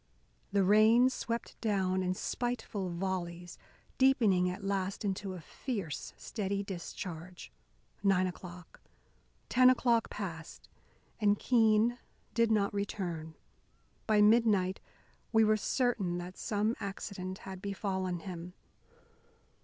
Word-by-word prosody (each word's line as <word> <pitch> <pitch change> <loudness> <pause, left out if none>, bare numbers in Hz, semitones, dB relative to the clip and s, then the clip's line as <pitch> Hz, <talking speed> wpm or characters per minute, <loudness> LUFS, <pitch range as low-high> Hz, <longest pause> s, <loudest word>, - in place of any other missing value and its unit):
The 200 -1 +3
rain 220 +6 +6
swept 230 -2 -4
down 190 -4 +1
in 185 0 0
spiteful 230 -5 -3
volleys, 175 -1 -4 0.4
deepening 220 -9 +4
at 185 +3 -6
last 195 +1 -2
into 190 -1 -2
a - - -7
fierce, 180 - -5
steady 200 -2 -3
discharge. 180 -2 -7 0.5
Nine 195 -2 +3
o'clock, 180 -1 -8 0.7
ten 255 0 +6
o'clock 240 -3 +3
passed, 165 -6 -7 0.5
and 205 -1 +3
Keene 230 0 +3 0.3
did 230 -1 +3
not 205 -2 +2
return. 175 -6 -3 0.7
By 210 -2 +5
midnight 210 -4 +4 0.5
we 225 -1 +5
were 215 0 +4
certain 215 -5 0
that 180 +1 -6
some 215 +1 0
accident 190 -2 -5
had 190 -1 -7
befallen 190 -3 -2
him. 180 -1 -7
195 Hz, 110 wpm, -32 LUFS, 185-220 Hz, 0.7 s, rain